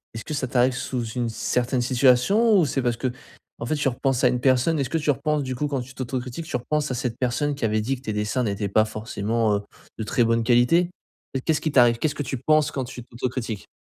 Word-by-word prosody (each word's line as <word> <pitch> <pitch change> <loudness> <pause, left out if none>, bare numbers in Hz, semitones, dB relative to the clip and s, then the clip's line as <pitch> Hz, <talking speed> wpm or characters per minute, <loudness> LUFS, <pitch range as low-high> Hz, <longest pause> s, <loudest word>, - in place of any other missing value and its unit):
est-ce 110 - -6
que - - -5
ça 140 -3 -1
t'arrive 125 +1 +2
sous 125 -1 -3
une 120 -1 -2
certaine 125 +2 -1
situation? 130 - +4
Ou 175 - +4
c'est 135 -1 -1
parce 120 -2 0
qu'en 125 -1 -7
fait, 155 - 0
tu 145 -1 0
repenses 130 0 0
à - - +7
une 125 0 +1
personne? 130 +5 +2
Est-ce 135 -3 -1
que 165 - 0
tu 150 -2 +2
repenses 145 +2 -1
du 130 -1 -4
coup 150 +4 -1
quand 140 -3 -2
tu 130 +2 -10
t'autocritiques, 130 +4 -5
tu - - -4
repenses 150 +4 -1
à - - -1
cette 120 -1 -3
personne 135 +3 0
qui 140 - -8
avait 110 0 +1
dit 130 +5 -1
que - - -17
tes 110 -5 -4
dessins 105 +5 -1
n'étaient 100 -2 -2
pas 110 +2 +3
forcément, 110 0 -1
heu, - - -5 0.4
de - - -1
très 115 +3 +1
bonne 115 0 +2
qualité? 125 +9 +4 0.6
Qu'est-ce 160 -2 +1
qui 155 - -1
t'arrive? 120 -3 +5
Qu'est-ce 150 +1 0
que 145 - -3
tu 135 0 -4
penses 155 +4 +2
quand 135 -2 -3
tu 125 -1 -9
t'autocritiques? 120 -3 -4
125 Hz, 245 wpm, -24 LUFS, 120-140 Hz, 0.6 s, à